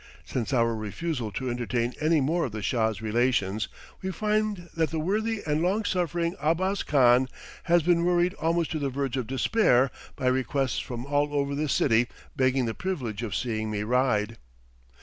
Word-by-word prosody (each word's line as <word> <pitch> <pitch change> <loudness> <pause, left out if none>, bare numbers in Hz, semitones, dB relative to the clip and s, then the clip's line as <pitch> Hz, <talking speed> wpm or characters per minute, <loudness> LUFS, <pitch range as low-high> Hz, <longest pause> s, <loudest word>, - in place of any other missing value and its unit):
Since 125 +1 -3
our 115 -3 +2
refusal 110 - -3
to 130 +6 -3
entertain 120 0 -1
any 155 0 +3
more 165 +6 +1
of 120 - -6
the 110 -2 -5
"Shah's 110 -2 0
relations," 110 -3 +1 0.3
we 190 - -3
find 210 -1 -1
that 160 -1 +1
the 160 - -3
worthy 210 +6 -1
and 150 0 +1
long 200 +5 +1
suffering 170 -2 0
Abbas 185 +6 +1
Khan 130 -2 +4 0.4
has 175 -1 +4
been 170 0 +3
worried 175 +1 +2
almost 165 0 +1
to 160 - -1
the 140 -1 -1
verge 135 -1 -2
of 125 -4 -2
despair 130 - +3 0.2
by 135 - -5
requests 130 0 +1
from 120 0 -5
all 145 +1 +1
over 140 0 0
the 150 +1 -1
city 120 -3 +3 0.3
begging 130 -2 +2
the 115 - -2
privilege 125 - -3
of 110 -5 -3
seeing 110 -3 -2
me 105 -1 -2
ride. 115 -2 +1
135 Hz, 175 wpm, -27 LUFS, 120-170 Hz, 0.4 s, Khan